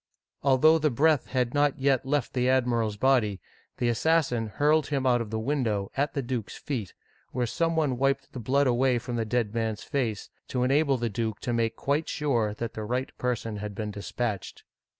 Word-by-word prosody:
Although 145 +4 +5
the 155 0 +2
breath 145 +2 +2
had 125 -2 0
not 145 -1 +2
yet 135 -1 +1
left 145 -3 0
the 125 0 +1
admiral's 120 -5 +1
body, 115 -5 +2 0.4
the 120 - 0
assassin 125 -2 +1
hurled 150 +7 +2
him 140 -2 -1
out 120 -2 +3
of 115 - -5
the 110 - -2
window, 110 -5 -1
at 145 +2 0
the 140 - -1
duke*s 120 -3 -4
feet, 115 - -4 0.4
where 125 -1 0
some 165 +7 0
one 145 -6 +1
wiped 135 0 0
the 130 - -5
blood 140 +5 +2
away 125 0 +3
from 120 +1 -4
the 115 -1 -1
dead 110 -1 -1
man's 110 -2 -2
face, 120 -8 -2 0.2
to 125 -1 -1
enable 140 +1 +3
the 120 -1 -1
duke 110 0 -2
to 120 - -2
make 115 -1 0
quite 145 +6 -1
sure 120 -8 0
that 115 +1 -4
the 110 - -5
right 125 +4 -3
person 115 -3 -2
had 105 0 -6
been 105 0 -3
dispatched. 105 0 -4
125 Hz, 195 wpm, -27 LUFS, 115-140 Hz, 0.4 s, Although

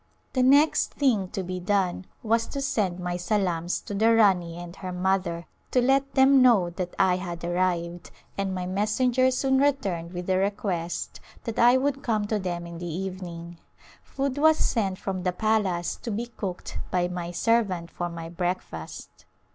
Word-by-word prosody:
The 255 - +2
next 285 +5 +4
thing 235 -10 +2
to 190 - -4
be 185 0 -4
done 190 -1 0 0.2
was 230 +1 +1
to 280 - -5
send 205 -10 -1
my 180 0 -2
salams 180 -3 0
to - - -7
the 225 +3 +4
Rani 180 -6 +3
and 175 0 -8
her 185 -1 -5
mother 180 -2 -1 0.2
to 255 - +2
let 270 +2 +2
them 270 0 +6
know 215 -9 +5
that 180 0 -5
I 185 -2 +3
had 175 -2 -6
arrived, 175 -1 -1 0.3
and 195 -1 -2
my 180 -1 -3
messenger 225 +7 +2
soon 265 +1 +1
returned 200 -13 0
with 180 0 -5
the 185 0 +1
request 190 -4 -2 0.2
that 230 -2 -4
I 245 +2 +6
would 275 +1 0
come 215 -3 0
to 210 0 -1
them 175 -2 -3
in 170 -1 -8
the 175 -1 -5
evening. 175 -1 -6 0.4
Food 275 0 -3
was 315 +1 +5
sent 195 -5 0
from 190 -2 -4
the 180 0 0
palace 190 -4 0
to - - -7
be 225 +2 -2
cooked 200 -6 -6
by 180 -1 +1
my 175 -1 -4
servant 185 -3 0
for 175 0 -3
my 165 -1 -7
breakfast. 175 - -5
190 Hz, 175 wpm, -26 LUFS, 175-230 Hz, 0.4 s, them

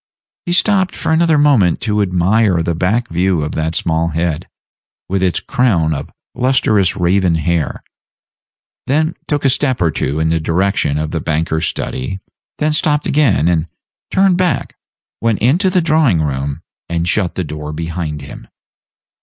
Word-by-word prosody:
He 175 - 0
stopped 190 0 +2
for - - -2
another 160 -1 +3
moment 135 - +3
to 105 -2 0
admire 95 0 +2
the 85 - -1
back 100 +8 0
view 90 -2 +1
of 75 - -3
that 80 +1 -2
small 80 0 0
head, 80 -1 -2 0.6
with 95 0 -1
its 90 -3 +1
crown 85 -11 +1
of 70 -1 -5 0.2
lustrous 125 -7 +2
raven 90 0 +2
hair, 80 0 -1 1.0
then 155 +4 +1
took 145 -2 -1
a - - +5
step 130 -2 0
or 85 -3 +2
two 75 +1 -2
in 80 0 +1
the 80 0 +1
direction 85 -2 0
of 75 0 -3
the 80 - -2
banker's 80 +1 -1
study, 80 +10 -4 0.4
then 150 0 0
stopped 150 -1 +1
again, 145 - +2
then 85 -1 +1 0.4
turned 190 -2 +3
back, 180 -3 -1 0.5
went 115 -2 +1
into 165 - +2
the 180 -1 +2
drawing 155 - +2
room, 70 -2 -3 0.3
and 85 0 -1
shut 95 -2 0
the 95 - -1
door 75 -1 -6
behind 80 -2 -4
him. - - -11
90 Hz, 160 wpm, -16 LUFS, 80-130 Hz, 1.0 s, a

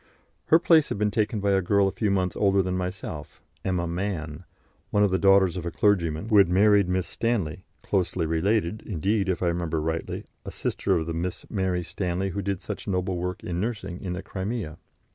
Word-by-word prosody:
Her 160 - +6
place 165 -3 +4
had - - -2
been 105 0 +1
taken 105 0 0
by 100 0 +2
a 95 0 +3
girl 100 +2 +3
a - - 0
few 100 +3 -1
months 95 -2 0
older 100 -1 +3
than 90 0 -2
myself, 90 -5 -5 0.2
Emma 90 -2 0
Mann, 85 -4 -4 0.4
one 105 - +3
of 100 - +3
the 95 - +2
daughters 95 -2 +5
of 90 - -4
a 85 - -2
clergyman, 85 0 +1
who 110 - +5
had 95 -3 +5
married 100 0 +4
Miss 90 -1 0
Stanley, 100 -8 -2 0.2
closely 90 -3 0
related, 95 +5 0
indeed, 100 +2 0
if 90 0 -1
I 85 - +3
remember 85 -2 -1
rightly, 80 +1 -3 0.2
a - - -6
sister - - -1
of 80 - -2
the 85 - -3
Miss 85 +2 -4
Mary 95 -3 0
Stanley 90 +2 -2
who 100 +2 -3
did 100 -1 -3
such 105 - -6
noble 90 -1 -1
work 90 +1 -4
in 85 0 -3
nursing 100 -4 -4
in 90 -2 -3
the 90 - -5
Crimea. 95 -5 -4
95 Hz, 205 wpm, -26 LUFS, 85-100 Hz, 0.4 s, Her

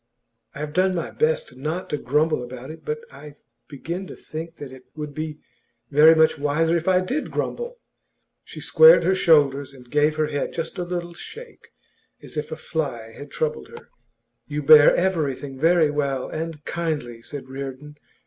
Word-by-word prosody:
I - - -8
have 150 0 -5
done 185 +1 +2
my 170 - -3
best 155 -3 0
not 155 +7 -4
to 150 - 0
grumble 150 +3 +1
about 125 +3 -8
it, 160 - -12
but 455 0 -3
I 150 - -12 0.3
begin 170 +6 -6
to - - -9
think 165 +1 -8
that 145 -4 -9
it 130 -1 -13
would 150 -1 -6
be 155 0 -5 0.5
very 155 +3 +7
much 160 -1 +3
wiser 155 +3 +1
if 170 +1 -2
I 185 -1 +4
did 260 +12 -3
grumble.' 485 +1 -4 0.7
She - - -10
squared 480 +1 +7
her 190 - +3
shoulders, 145 -6 +3
and 125 -2 -16
gave 150 +1 +3
her 155 0 +1
head 145 -1 -3
just 165 +2 -5
a - - -1
little 175 -1 -4
shake, 465 - -11 0.5
as - - -12
if 150 0 -4
a 160 - -4
fly 135 -9 -4
had 145 +5 -11
troubled 475 -1 -3
her. 465 0 -13 0.6
'You 150 0 -3
bear 150 0 +8
everything 145 -7 -1
very 165 -1 +4
well 140 -3 -1
and 160 -1 -6
kindly,' 150 -9 -3
said 135 +2 -8
Reardon. 135 +2 -7
155 Hz, 175 wpm, -23 LUFS, 140-170 Hz, 0.7 s, bear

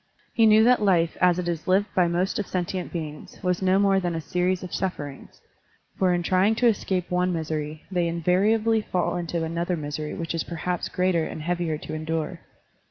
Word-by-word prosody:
He 225 -2 +5
knew 215 +1 +6
that 245 0 +4
life 175 -5 +2
as 180 -1 +4
it 180 -1 -2
is 170 -1 -3
lived 190 +2 +3
by 180 -2 +3
most 175 +4 0
of 205 - -3
sentient 180 0 -3
beings 155 -3 -6
was 180 0 0
no 190 0 +3
more 195 -1 +3
than 175 -2 -2
a - - -1
series 180 +4 -1
of 180 - -7
sufferings, 145 -7 -5 0.5
for 185 -1 +2
in 175 -1 0
trying 190 +5 +3
to 245 - +1
escape 190 -6 +1
one 180 0 +1
misery 155 -2 -3
they 175 -2 +1
invariably 205 +7 +2
fall 175 -4 -1
into 170 -1 -2
another 170 +2 -2
misery 150 0 -4
which 165 -1 -4
is 165 - -1
perhaps 175 +1 -3
greater 180 -3 +1
and 155 - -6
heavier 170 -2 -1
to 155 - -8
endure. 160 +2 -3
175 Hz, 195 wpm, -25 LUFS, 165-185 Hz, 0.5 s, knew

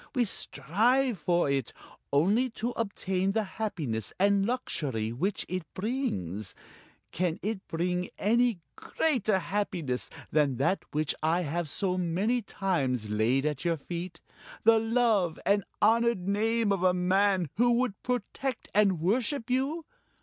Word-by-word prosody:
We 245 -2 +3
strive 235 - +1
for 175 0 +2
it, 135 -3 -1 0.4
only 200 - +3
to 235 +2 -1
obtain 195 -4 -1
the 220 0 +1
happiness 175 - -3
and 200 0 +3
luxury 135 - -2
which 185 - -1
it 185 -1 -3
brings. 110 - -3 0.6
Can 175 -1 -1
it 210 -1 -3
bring 180 +2 -1
any 230 -2 +2
greater 240 -10 0
happiness 180 -8 -2 0.2
than 145 -3 +2
that 140 +9 +1
which 155 -1 0
I 165 +3 +2
have 165 0 -2
so 185 +1 -1
many 190 +8 +1
times 140 - -1
laid 120 +6 +2
at 150 -3 -1
your 170 -1 +1
feet 170 +4 -6 0.4
the 225 0 +6
love 225 -7 +2
and 200 0 +3 0.2
honored 230 -3 +3
name 220 +2 +1
of 195 -3 +1
a 185 -1 +3
man 185 -2 +2
who 240 +2 +4
would 240 -4 0
protect 250 +1 -3
and 200 -4 +3
worship 240 - 0
you? 280 +6 0
195 Hz, 135 wpm, -29 LUFS, 165-225 Hz, 0.6 s, the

